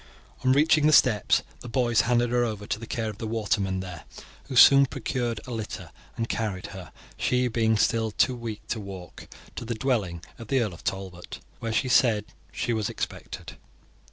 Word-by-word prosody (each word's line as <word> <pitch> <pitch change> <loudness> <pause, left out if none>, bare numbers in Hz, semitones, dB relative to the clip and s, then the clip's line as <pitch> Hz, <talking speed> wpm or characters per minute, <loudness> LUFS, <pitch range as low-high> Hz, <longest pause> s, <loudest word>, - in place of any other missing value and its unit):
On 130 - +4
reaching 150 +2 +4
the 155 - +4
steps 110 -8 +4 0.2
the 120 - -9
boys 120 -2 +2
handed 120 0 +1
her 120 0 +3
over 105 -3 -3
to 105 - -2
the 115 - -8
care 110 -2 -2
of 105 - -15
the 110 - -4
watermen 100 -4 -1
there, 90 -3 -8 0.4
who 135 - -5
soon 140 +2 +8
procured 120 -3 -2
a 125 - -8
litter 105 -7 -5 0.3
and 115 - -1
carried 105 -6 -2
her, 90 -5 -9 0.3
she 125 0 +1
being 110 -2 +2
still 110 +1 +2
too 125 +4 +2
weak 115 -3 -7
to 115 - -1
walk, 95 -3 -9 0.3
to - - -5
the 115 0 -3
dwelling 105 -9 -1 0.2
of 115 - -9
the 135 +3 +2
Earl 110 -6 -1
of 85 - -13
Talbot, 95 -2 -5 0.2
where 115 - -3
she 115 - +1
said 115 -4 +3 0.3
she 120 - -1
was 110 -2 -1
expected. - - -6
115 Hz, 190 wpm, -26 LUFS, 105-125 Hz, 0.4 s, soon